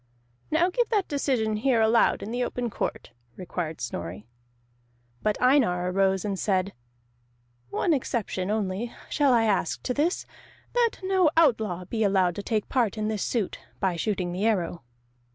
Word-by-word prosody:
"Now 340 +4 +2
give 480 +4 +1
that 415 -5 +1
decision 250 -7 0
here 245 +1 +2
aloud 225 +1 +3
in 215 - -5
the 245 +1 -1
open 245 -1 -3
court," - - -4 0.2
required 170 -3 -4
Snorri. 95 -3 -5 1.0
But 210 -1 0
Einar 205 -10 +3
arose 190 0 +2
and 195 -2 -2
said: 195 -1 0 1.0
"One 335 - +1
exception 220 -8 -2
only 210 +2 -1 0.2
shall 285 -3 +3
I 235 -2 +4
ask 200 -6 0
to 250 - -1
this, 310 +7 0 0.5
that 480 -2 +2
no 375 -3 +3
outlaw 220 - +2
be 220 +4 -1
allowed 190 -3 +3
to - - -2
take 215 0 -1
part 235 -5 +1
in 215 0 -1
this 215 -3 -2
suit, 225 -6 -1 0.2
by 190 -3 +1
shooting 180 0 -1
the 190 +5 0
arrow." 180 -5 0
215 Hz, 155 wpm, -26 LUFS, 185-255 Hz, 1.0 s, I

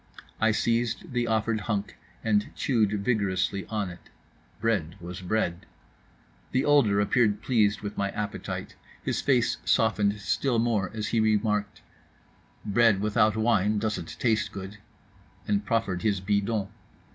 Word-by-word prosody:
I 110 - +3
seized 115 +2 0
the 120 -1 0
offered 110 0 +1
hunk, 105 -2 -3 0.3
and 105 -2 +1
chewed 105 -5 +1
vigorously 100 -4 0
on 105 -4 -2
it. 85 - -14 0.5
Bread 95 -8 0
was 90 +1 -7
bread. 90 -2 -1 0.9
The 130 +1 +2
older 135 -9 +4
appeared 105 0 +2
pleased 110 -4 +2
with 105 0 -5
my 100 0 0
appetite; 105 +1 -5 0.3
his - - -1
face 120 -3 +2
softened 105 -2 +2
still 120 +4 0
more, 110 -5 +1
as 105 -1 -3
he 115 - +1
remarked: 105 -1 0 0.8
"Bread 110 -1 +4
without 105 +1 +2
wine 110 -2 +2
doesn't 105 -5 -3
taste 115 -3 +1
good," 100 +1 -8 0.7
and 100 0 +1
proffered 105 -6 0
his 100 -2 +1
bidon. 100 +1 0
105 Hz, 135 wpm, -27 LUFS, 100-115 Hz, 0.9 s, older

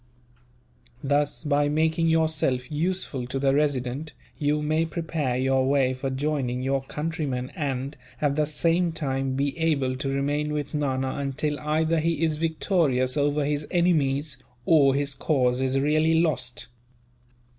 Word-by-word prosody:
Thus, 145 +2 0
by 145 -1 +2
making 160 +2 +1
yourself 155 -6 +1
useful 155 -5 -2
to 130 - -3
the 135 0 +2
Resident, 145 0 -1 0.3
you 150 0 +1
may 155 +2 +1
prepare 160 -5 -2
your 130 0 +2
way 135 -2 +2
for 130 +1 -3
joining 130 -2 -1
your 135 +1 0
countrymen 145 -3 -3
and, 140 -3 -3 0.2
at 145 -2 +1
the 150 0 +1
same 165 +2 +1
time, 135 -4 -2
be 140 0 -1
able 140 -6 +1
to 135 +1 -3
remain 145 +2 -1
with 150 -1 -3
Nana 135 -3 -1
until 140 +2 -2
either 160 +2 +1
he 165 0 0
is 155 -2 +1
victorious 155 -5 +1
over 145 0 +1
his 150 +1 -2
enemies, 150 -6 +1 0.3
or 140 -3 +5
his 140 0 0
cause 130 -4 +1
is 130 +1 +1
really 155 +3 +2
lost." 130 -8 -1
145 Hz, 145 wpm, -25 LUFS, 135-155 Hz, 0.3 s, or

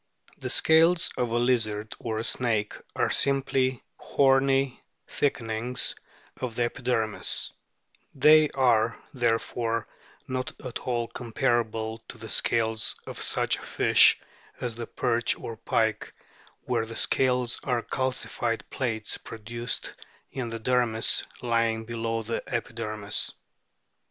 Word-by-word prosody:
The - - -4
scales 165 +2 +4
of 125 -2 -1
a 115 - 0
lizard 110 -3 +1
or 110 -2 -3
a 110 - -2
snake 110 -3 0 0.2
are - - +1
simply 135 -2 +1
horny 135 -1 +2 0.3
thickenings 120 -2 0 0.4
of 125 -3 -4
the 120 - +1
epidermis; 120 -3 0 0.6
they 150 +2 +6
are, 115 -4 +2 0.2
therefore, 115 -2 0 0.4
not 130 0 -4
at 125 - -4
all 120 -2 -2
comparable 115 -2 -1
to - - -9
the 110 0 -9
scales 110 0 +1
of - - -7
such - - +2
a - - -12
fish - - +5 0.4
as 120 -2 -3
the 115 -1 -6
perch 120 -1 +1
or 115 - -7
pike, 110 0 0 0.5
where 120 -3 0
the 115 - -8
scales 125 -1 +1
are 125 -3 0
calcified 120 -3 -2
plates 115 -5 -2
produced 115 +2 -5 0.4
in 125 -3 -4
the 115 0 -5
dermis 120 -1 +2 0.2
lying 115 -2 +1
below 115 -1 -2
the 115 +2 -3
epidermis. 110 -3 -2
120 Hz, 120 wpm, -27 LUFS, 115-125 Hz, 0.6 s, they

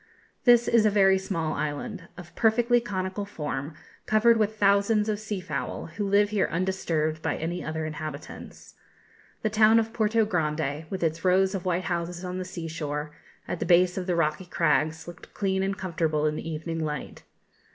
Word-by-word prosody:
This 240 -1 +6
is 230 -2 +4
a 215 - +5
very 195 -2 +4
small 165 -5 -2
island, 165 +5 -4
of 175 -2 -11
perfectly 240 +2 +3
conical 190 -2 -3
form, 150 -6 -5 0.3
covered 225 +2 +4
with 215 0 0
thousands 200 +1 +3
of 210 -1 -1
sea 215 -2 -4
fowl, 180 -2 -5
who 205 -1 -2
live 205 +1 +3
here 205 -3 +2
undisturbed 165 -4 -1
by - - -1
any 170 +3 -3
other 155 0 -3
inhabitants. 155 -1 -8 0.7
The 215 - 0
town 215 +1 +5
of 225 0 0
Porto 220 0 +2
Grande, 155 -5 -1
with 190 -2 -4
its 165 0 -1
rows 190 +1 +3
of 190 -1 -4
white 180 0 0
houses 175 0 -3
on 180 +1 -4
the 185 - -4
sea 175 -3 -6
shore, 150 -2 -4 0.4
at 175 - -3
the - - -2
base 180 +1 +4
of 185 -1 -4
the 180 - +1
rocky 160 +2 0
crags, 160 -2 0
looked 175 -1 -12
clean 190 -1 0
and 195 +1 -1
comfortable 160 -5 -1
in 150 0 +1
the 165 - -5
evening 165 +1 -3
light. 150 -2 -5
180 Hz, 185 wpm, -26 LUFS, 160-205 Hz, 0.7 s, This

